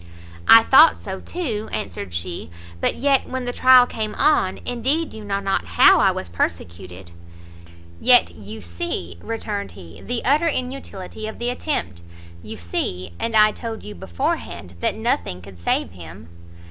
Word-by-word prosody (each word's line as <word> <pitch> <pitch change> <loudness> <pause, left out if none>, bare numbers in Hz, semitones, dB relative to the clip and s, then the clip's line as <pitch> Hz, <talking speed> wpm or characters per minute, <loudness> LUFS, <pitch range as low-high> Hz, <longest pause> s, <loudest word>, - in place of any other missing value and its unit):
"I 225 0 +9
thought 300 +7 +6
so 190 -1 -7
too," 235 -12 -4
answered 95 0 -5
she, 85 -1 -5 0.3
"but - - 0
yet 275 -1 +1
when 260 -1 -4
the 245 - -3
trial 255 -1 +6
came 220 -3 -4
on, 190 -11 +2
indeed 265 +7 -1
you 220 - -9
know 200 -1 -2
not 195 -1 -1
how - - +7
I - - +4
was 95 - -4
persecuted." 85 +1 -5 0.9
"Yet 245 -1 +5
you 105 +2 -10
see," 85 0 -5
returned 210 -3 -5
he, 80 -1 -13
"the 245 -1 -4
utter 295 +6 +3
inutility 250 - -4
of 220 - -7
the 240 +1 -2
attempt; 245 - -3 0.4
you 110 +3 -8
see, 90 +1 -4
and 230 -1 -2
I 215 0 +6
told 225 0 -7
you 105 - -8
beforehand, 85 0 -4
that - - -1
nothing 90 - -2
could 90 -1 -14
save 85 - -1
him." 85 +1 -12
200 Hz, 160 wpm, -21 LUFS, -, 0.9 s, I